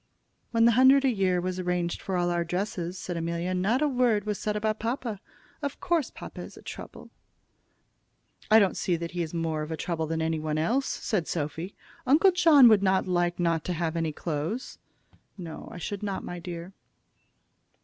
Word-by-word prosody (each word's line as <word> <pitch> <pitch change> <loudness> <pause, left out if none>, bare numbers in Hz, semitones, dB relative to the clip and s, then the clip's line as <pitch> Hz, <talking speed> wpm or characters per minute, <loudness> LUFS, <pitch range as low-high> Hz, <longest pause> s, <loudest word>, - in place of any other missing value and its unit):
"When 230 -1 +3
the 235 - +6
hundred 260 +3 +6
a 265 - +4
year 190 -4 +1
was 185 +1 -3
arranged 180 -1 -1
for 190 -2 -2
all 175 0 +1
our 170 0 +1
dresses," 180 0 -3
said 180 -1 -5
Amelia, 170 +2 -2
"not 210 +10 +1
a - - +3
word 245 -6 +2
was 210 -2 -2
said 210 -1 -2
about 215 +1 -1
papa. 230 -3 -3 0.4
Of 285 -1 -4
course, 335 -5 0
papa - - -9
is - - -10
a - - -13
trouble." - - -9 1.4
"I 215 - +8
don't 200 -4 +4
see 180 - 0
that 170 0 -5
he 175 - -3
is 160 -2 -3
more 165 -2 -2
of 155 - -5
a 160 - -3
trouble 160 -2 -2
than 160 +1 -2
any 160 0 0
one 155 0 -2
else," 240 - +1
said 190 -8 -2
Sophy. 160 +4 -4 0.3
"Uncle 315 +9 +6
John 325 -7 +7
would 215 -3 +6
not 190 -1 +2
like 175 -1 0
not 165 -2 +1
to 180 - -1
have 165 -1 -2
any 165 -1 0
clothes." 165 - -4 0.6
"No, 170 -4 -8
I - - -8
should 200 +3 -5
not, 200 -2 -3
my 175 - -6
dear." 175 +1 -7
180 Hz, 195 wpm, -27 LUFS, 170-220 Hz, 1.4 s, I